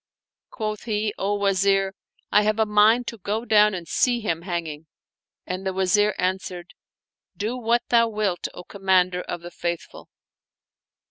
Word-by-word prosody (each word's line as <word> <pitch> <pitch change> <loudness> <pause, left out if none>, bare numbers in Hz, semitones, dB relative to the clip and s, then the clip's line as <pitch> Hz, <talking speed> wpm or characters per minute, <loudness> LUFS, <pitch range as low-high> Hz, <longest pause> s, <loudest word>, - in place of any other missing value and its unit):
Quoth 215 -2 -4
he, 210 -2 -1
" - - -38
O 200 +1 0
Wazir, 195 -1 +2 0.4
I 210 - +5
have 215 +1 +1
a 220 - +3
mind 215 +3 +4
to 230 - -6
go 210 +5 -3
down 210 -2 +4
and 170 -2 -7
see 245 +8 +2
him 170 -7 -2
hanging 165 -4 -5 0.3
"; - - -69
and 185 +1 -4
the 190 -1 -2
Wazir 190 +2 +2
answered, 180 -1 -3 0.3
" - - -50
Do 215 +4 -2
what 240 -1 +1
thou 230 -1 +4
wilt, 210 -5 -1
O 180 - -8
Commander 185 -2 +1
of 175 - -6
the 175 0 -9
Faithful." 170 -1 -5
200 Hz, 165 wpm, -24 LUFS, 180-215 Hz, 0.4 s, I